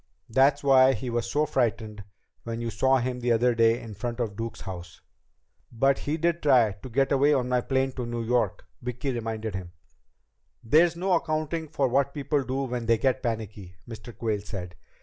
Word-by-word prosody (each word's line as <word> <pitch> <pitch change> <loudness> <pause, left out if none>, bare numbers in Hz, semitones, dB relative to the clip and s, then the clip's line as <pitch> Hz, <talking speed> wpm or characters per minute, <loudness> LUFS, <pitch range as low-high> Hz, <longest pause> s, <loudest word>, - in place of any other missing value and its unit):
That's 135 +4 +3
why 135 -1 +6
he 130 -2 -4
was 120 0 -2
so 150 +1 +1
frightened 110 -7 -1 0.4
when 115 0 -5
you 115 -1 -3
saw 135 +3 +3
him 125 0 -2
that 120 0 +2
day 115 +1 +4
in 115 -3 -9
front 120 +4 -5
of 110 -4 -2
Duke's 115 +1 -5
house." 90 -3 -8 0.7
"But 135 +4 +2
he 150 +2 -2
did 170 +1 0
try 125 -7 +4
to 105 +7 -11
get 135 +3 +1
away 140 +2 +4
on 125 -2 0
my 125 -1 +2
plane 135 +1 0
to 125 -2 -5
New 120 0 -3
York," 120 +1 0 0.2
Vicki 125 +2 -3
reminded 110 -3 -4
him. 90 -2 -6 0.9
"There's 160 +8 +4
no 185 +2 0
accounting 160 -1 -1
for 145 -3 0
what 140 +3 +1
people 145 0 0
do 130 +1 -2
when 120 -3 -4
they 115 -1 +4
get 130 +2 0
panicky," 110 -6 -5
Mr. 115 0 -10
Quayle 110 -3 -1
said. 95 -4 -7
125 Hz, 190 wpm, -26 LUFS, 115-135 Hz, 0.9 s, why